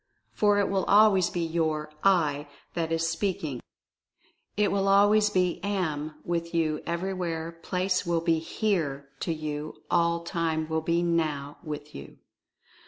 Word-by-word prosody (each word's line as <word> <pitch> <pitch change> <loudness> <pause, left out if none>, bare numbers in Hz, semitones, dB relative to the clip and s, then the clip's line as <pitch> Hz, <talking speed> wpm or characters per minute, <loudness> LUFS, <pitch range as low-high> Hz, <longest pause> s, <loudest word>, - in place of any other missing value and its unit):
For 205 -1 +3
it 200 - +2
will 195 -1 0
always 200 -3 +5
be 175 -1 -2
your 160 -2 -1
"I" 150 -7 +2 0.3
that 165 -1 -2
is 165 0 +1
speak 165 +3 -1
ing 135 -6 -4 0.5
— - - -40
it 210 -1 +3
will 195 0 +1
always 205 +2 +5
be 180 -3 0
"Am" 160 -7 -2
with 170 0 -2
you 155 -2 +1
— - - -24
everywhere 170 -2 -2
place 180 +1 0
will 170 -1 +1
be 165 -1 +2
"Here" 160 -6 -1
to 170 - -2
you 155 -1 -4
— - - -17
all 170 -1 +2
time 165 -2 -1
will 160 0 -1
be 170 +2 +1
"Now" 155 -4 -1
with 150 -2 -7
you. 70 - -10
170 Hz, 165 wpm, -27 LUFS, 155-185 Hz, 0.5 s, always